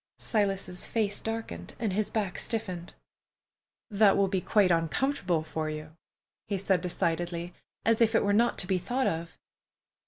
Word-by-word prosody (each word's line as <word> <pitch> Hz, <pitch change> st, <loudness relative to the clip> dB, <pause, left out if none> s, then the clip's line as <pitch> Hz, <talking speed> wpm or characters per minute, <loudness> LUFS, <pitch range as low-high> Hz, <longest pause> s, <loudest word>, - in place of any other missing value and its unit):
Silas's 195 Hz, -4 st, -1 dB
face 210 Hz, -3 st, 0 dB
darkened 225 Hz, 0 st, -5 dB
and 220 Hz, -5 st, -1 dB
his 210 Hz, +1 st, 0 dB
back 205 Hz, -5 st, -2 dB
stiffened. 185 Hz, -7 st, -3 dB, 1.0 s
"That 205 Hz, -1 st, +5 dB
will 200 Hz, -, +3 dB
be 190 Hz, -1 st, 0 dB
quite 200 Hz, -3 st, +3 dB
uncomfortable 175 Hz, -, +1 dB
for 155 Hz, 0 st, -3 dB
you," 155 Hz, +1 st, -7 dB, 0.5 s
he 200 Hz, -, -1 dB
said 190 Hz, -2 st, +1 dB
decidedly, 175 Hz, 0 st, -2 dB, 0.3 s
as 225 Hz, 0 st, +3 dB
if 225 Hz, 0 st, +4 dB
it -, -, +4 dB
were 200 Hz, -, +2 dB
not 235 Hz, +3 st, +3 dB
to -, -, +2 dB
be 185 Hz, -1 st, +1 dB
thought 250 Hz, +8 st, -1 dB
of. 165 Hz, 0 st, -2 dB
195 Hz, 155 wpm, -29 LUFS, 175-220 Hz, 1.0 s, That